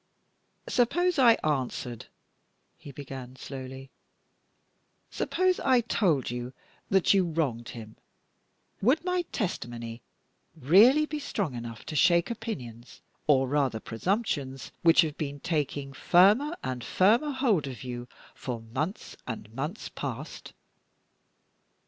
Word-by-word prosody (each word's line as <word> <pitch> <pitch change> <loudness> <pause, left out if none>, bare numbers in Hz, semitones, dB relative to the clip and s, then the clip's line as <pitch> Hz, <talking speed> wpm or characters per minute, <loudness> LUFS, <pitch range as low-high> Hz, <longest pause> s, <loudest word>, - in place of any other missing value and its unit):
"Suppose 345 +7 +2
I 240 -3 +8
answered," 130 -5 -2 0.7
he 145 - -11
began, 130 -2 -8
slowly; 130 0 -8 1.2
"suppose 370 0 +1
I 255 -2 +4
told 175 - +1
you 120 +1 -5 0.4
that 190 0 +4
you 195 -1 +4
wronged 150 -9 -2
him, 110 -2 -10 0.8
would 275 - +3
my 360 0 +1
testimony 120 - -4 0.5
really 205 - +6
be 300 0 -4
strong 205 - -2
enough 115 -2 -7
to 155 - -6
shake 170 - +4
opinions, 130 - -7 0.3
or 135 -3 +4
rather 135 -4 +1
presumptions, 135 - -2
which 165 0 +6
have 155 -3 -3
been 145 -2 -4
taking 145 -3 -2
firmer 210 - +4
and 125 -2 -3
firmer 225 +10 +3
hold 245 - +1
of 130 -2 -7
you 125 -1 -6 0.3
for 125 -3 -5
months 130 - -4
and 110 -2 -6
months 150 - -4
past? - - -6
150 Hz, 115 wpm, -28 LUFS, -, 1.2 s, I